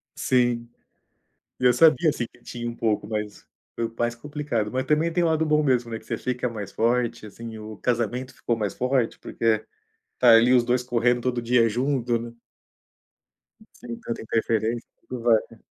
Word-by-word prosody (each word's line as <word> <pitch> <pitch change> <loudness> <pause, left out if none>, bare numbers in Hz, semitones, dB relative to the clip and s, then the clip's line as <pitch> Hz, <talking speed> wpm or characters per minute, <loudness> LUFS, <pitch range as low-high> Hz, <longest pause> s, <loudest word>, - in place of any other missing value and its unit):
Sim. 120 -2 +1 0.9
E - - -2
eu 125 - +7
sabia 160 +5 +5
assim 120 - -3
que - - -23
tinha 120 0 -5
um 115 - -8
pouco 110 -2 0
mais, 105 -1 -4 0.5
mais 120 0 0
complicado, 140 -4 -3
mas 130 +2 -1
também 155 +2 +2
tem 175 +1 +2
o - - +3
lado 160 0 +2
bom 150 0 +3
mesmo, 125 -4 +1
né, 115 - -3
que - - -19
você - - -3
fica 125 0 -2
mais 105 -4 -6
forte 120 -1 0
assim, 110 +1 -9
o 110 0 -8
casamento 125 +2 -1
ficou 120 - -1
mais 105 -3 -2
forte, 125 -2 0
porque - - -7 0.7
está 120 -2 +6
ali 120 +3 +5
os 125 -2 +5
2 125 +1 +1
correndo 120 0 +1
todo 125 -1 -1
dia 120 0 +3
junto, 125 +1 0
né. 115 0 -8 1.4
Sem 120 -1 -8
tanta 115 - -5
interferência, 115 +1 -1 0.2
tudo 125 -2 -5
vai, 115 -2 +5
né. 115 - -15
120 Hz, 180 wpm, -25 LUFS, 115-125 Hz, 1.4 s, eu